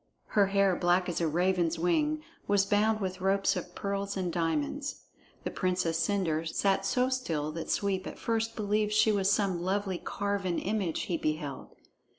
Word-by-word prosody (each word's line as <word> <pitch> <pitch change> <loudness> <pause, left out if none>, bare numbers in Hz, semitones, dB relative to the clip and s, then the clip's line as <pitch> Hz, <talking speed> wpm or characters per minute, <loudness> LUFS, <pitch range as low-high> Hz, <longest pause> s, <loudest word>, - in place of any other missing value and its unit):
Her 200 -2 +4
hair, 195 -1 +3
black 175 +1 +2
as 175 - -2
a 165 - +2
raven's 175 0 +1
wing, 300 - +1 0.2
was 200 -1 +3
bound 215 +2 +2
with 185 -1 -3
ropes 195 +1 +2
of 180 -1 -6
pearls 200 0 -2
and 180 -3 -2
diamonds. 165 - -1 0.4
The - - -3
Princess 180 -3 0
Cendre 165 -3 0
sat 195 +3 +1
so 250 +5 +2
still 165 - -1
that 165 +1 -6
Sweep 190 -2 0
at - - -7
first 225 0 -1
believed 210 0 0
she 215 +1 +5
was 195 -1 +2
some 190 -4 +1
lovely 190 0 -1
carven 200 -3 -2
image 195 -5 -1
he 170 - -1
beheld. 155 -3 -4
190 Hz, 165 wpm, -30 LUFS, 175-205 Hz, 0.4 s, she